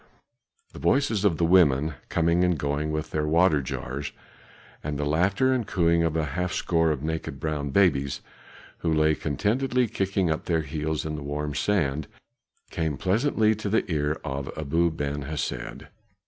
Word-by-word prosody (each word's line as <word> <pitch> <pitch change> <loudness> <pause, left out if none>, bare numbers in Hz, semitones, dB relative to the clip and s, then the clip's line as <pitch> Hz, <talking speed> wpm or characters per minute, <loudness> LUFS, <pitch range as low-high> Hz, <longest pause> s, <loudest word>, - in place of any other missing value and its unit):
The - - -9
voices 135 -8 +2
of 95 -6 +3
the 85 - +2
women, 80 -4 +4 0.2
coming 85 +1 +2
and 90 -2 +2
going 75 +2 -1
with 75 0 -3
their 75 -1 -1
water 80 -1 +4
jars, 65 +2 -5 0.7
and 75 -1 -3
the 75 - -1
laughter 95 - +2
and 125 -4 -1
cooing 85 -2 +2
of 80 -1 0
half 80 +3 -1
a - - -5
score 80 -1 +2
of 75 -3 -2
naked 80 -3 -3
brown 75 -1 -2
babies, 70 -5 +2 0.6
who 85 - -1
lay 80 0 +3
contentedly 115 - 0
kicking 95 -4 0
up 80 - -2
their 80 -2 +1
heels 75 +1 -3
in 75 -1 -3
the - - -6
warm 75 +1 -3
sand, 80 -5 0 0.6
came 80 -4 -2
pleasantly 110 - +2
to 105 -1 -4
the 110 - +2
ear 75 0 0
of 70 -2 -4
Abu 85 +4 +1
Ben 75 -2 -3
Hesed. 70 -4 -4
80 Hz, 165 wpm, -26 LUFS, 75-90 Hz, 0.7 s, women